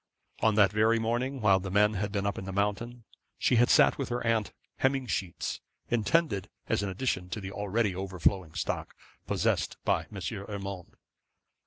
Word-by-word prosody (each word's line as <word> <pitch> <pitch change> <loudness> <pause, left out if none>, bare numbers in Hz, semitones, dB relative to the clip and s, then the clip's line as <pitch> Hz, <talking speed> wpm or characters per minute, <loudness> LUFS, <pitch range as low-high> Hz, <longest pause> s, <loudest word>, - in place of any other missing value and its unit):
On 110 -1 +3
that 100 -3 +5
very 110 +2 +3
morning, 120 +4 -1
while 100 -3 +5
the 95 +1 -5
men 105 +2 +4
had 100 0 -2
been 100 -1 -1
up 100 -1 -1
in 95 - -7
the 95 - -5
mountain, 105 +5 -2 0.3
she 125 - +2
had 120 +1 +5
sat - - +5
with 135 - -2
her 120 0 -2
aunt 115 -2 +1 0.3
hemming 135 0 +1
sheets; 95 -7 -3 0.3
intended 115 - +1 0.2
as - - +1
an 100 - -2
addition 95 -3 -2
to 110 - -4
the 95 -1 -6
already 105 0 0
overflowing 95 -2 0
stock - - -3 0.3
possessed - - 0
by - - +1
M. - - -6 0.3
Urmand. 100 -3 -6
105 Hz, 175 wpm, -29 LUFS, 95-115 Hz, 0.3 s, that